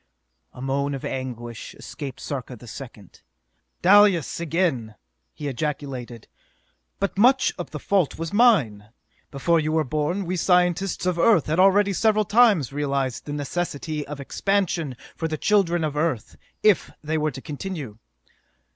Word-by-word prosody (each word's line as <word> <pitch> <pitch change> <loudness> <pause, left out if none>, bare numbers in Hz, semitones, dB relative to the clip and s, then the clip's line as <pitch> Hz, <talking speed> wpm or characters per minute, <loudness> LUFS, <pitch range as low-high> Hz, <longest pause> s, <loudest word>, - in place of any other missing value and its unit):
A 125 - -10
moan 140 +1 -1
of 135 - -7
anguish 120 -3 -6
escaped 140 -4 -8
Sarka 130 -3 -5
the 120 - -14
Second. 115 -5 -11 0.6
"Dalis 195 -5 +5
again!" 160 -10 -1 0.4
he 150 -1 -6
ejaculated. 135 -4 -4 0.7
"But - - -2
much 260 +4 +4
of 175 - -5
the 150 - -6
fault 185 +1 0
was 165 +2 -5
mine! 145 - +3 0.4
Before 165 +4 +1
you 155 0 -1
were 160 -1 +2
born, 155 +8 -1
we 180 +2 -2
scientists 180 +2 +1
of 180 -2 0
Earth 190 -5 +4
had 160 +3 0
already 195 +1 +5
several 215 +1 +2
times 205 - +4
realized 140 -3 -2
the 145 - -5
necessity 150 0 -3
of 150 0 -7
expansion 170 -2 -1 0.2
for 160 - -2
the 155 -1 -3
children 175 -3 +2
of 150 -2 -2
Earth 150 -7 -1 0.3
if 210 -5 +4
they 155 +1 -1
were 155 0 +1
to 140 - -8
continue. 150 - -6
155 Hz, 145 wpm, -24 LUFS, 135-185 Hz, 0.7 s, Dalis